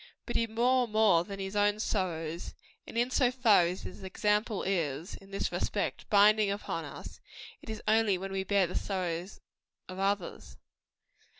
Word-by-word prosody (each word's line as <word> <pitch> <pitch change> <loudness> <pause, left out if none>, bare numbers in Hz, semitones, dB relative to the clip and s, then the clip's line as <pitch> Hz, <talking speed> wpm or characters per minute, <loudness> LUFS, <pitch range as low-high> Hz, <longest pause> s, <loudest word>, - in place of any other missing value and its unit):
But - - -5
he 230 - +2
bore 245 +3 +2
more 210 -6 +4
than 195 +2 -7
his 195 +1 -5
own 205 0 +2
sorrows; 170 -6 -3 0.3
and - - -7
in 240 +2 +1
so 255 -2 +3
far 235 -8 +4
as 180 +2 -5
his - - -9
example 210 +3 0
is, 170 -4 -2
in 195 - -17
this 195 - -2
respect, - - -2
binding 210 0 +5
upon 200 +1 -3
us, - - -9 0.4
it - - -11
is 220 -1 -6
only 215 -3 +3
when 195 +1 -6
we 190 0 -1
bear 195 0 +2
the 175 - -6
sorrows 180 -1 -3 0.5
of 185 0 -8
others. 190 - -2
200 Hz, 170 wpm, -30 LUFS, 185-215 Hz, 0.5 s, binding